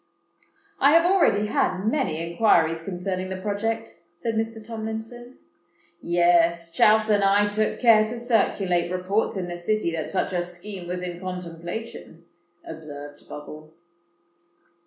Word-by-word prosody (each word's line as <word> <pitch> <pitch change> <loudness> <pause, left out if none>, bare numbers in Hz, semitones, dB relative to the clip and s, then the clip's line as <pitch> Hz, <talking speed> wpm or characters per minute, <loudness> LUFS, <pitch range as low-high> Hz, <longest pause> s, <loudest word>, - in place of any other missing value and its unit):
"I 280 +2 +5
have 335 +1 +6
already 345 - +3
had 195 -2 0
many 225 - 0
inquiries 165 -3 +3
concerning 185 +1 -4
the 190 - -4
project," 220 +3 -3 0.2
said 230 +5 -3
Mr. 225 +1 -2
Tomlinson. 225 +2 -6 0.6
"Yes—Chouse 175 +5 +3
and 205 -1 +3
I 200 +1 +4
took 215 +1 -1
care 225 -3 +6
to 235 +2 -5
circulate 195 -7 +1
reports 190 +4 -1
in 180 -2 -3
the 175 0 -6
City 195 0 0
that 160 -2 -3
such 175 - -1
a 175 - +1
scheme 175 +1 -7
was 180 0 -4
in 175 -1 -5
contemplation," 175 0 -7 0.4
observed 145 -2 -10
Bubble. 155 +1 -10
185 Hz, 130 wpm, -24 LUFS, 170-220 Hz, 0.6 s, have